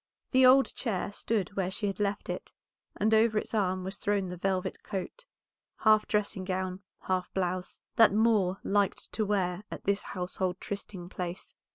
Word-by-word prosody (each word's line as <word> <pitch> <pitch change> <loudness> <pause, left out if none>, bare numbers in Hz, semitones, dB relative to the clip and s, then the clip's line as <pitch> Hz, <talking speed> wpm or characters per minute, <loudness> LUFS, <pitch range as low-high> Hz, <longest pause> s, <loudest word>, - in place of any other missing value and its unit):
The 260 -1 +7
old 270 +1 +6
chair 205 -5 -2
stood 205 -1 -2
where 190 -2 0
she 205 +3 -3
had 195 0 -2
left 205 0 -1
it, - - -5 0.4
and 220 +2 +2
over 220 0 +4
its - - -2
arm 185 -3 +1
was 190 +1 -5
thrown 200 -2 0
the 180 - -5
velvet 185 +1 -1
coat, 205 - -5 0.5
half 215 -1 +4
dressing 210 -2 0
gown, 185 0 -2 0.2
half 185 -1 -1
blouse, 185 -1 -2 0.2
that 225 -4 +8
Moor 210 -3 +3
liked 200 -1 0
to 215 - 0
wear 185 -3 0
at - - -7
this 200 0 +1
household 180 0 -3
trysting 200 -3 -6
place. 180 -1 -6
195 Hz, 170 wpm, -30 LUFS, 185-215 Hz, 0.5 s, that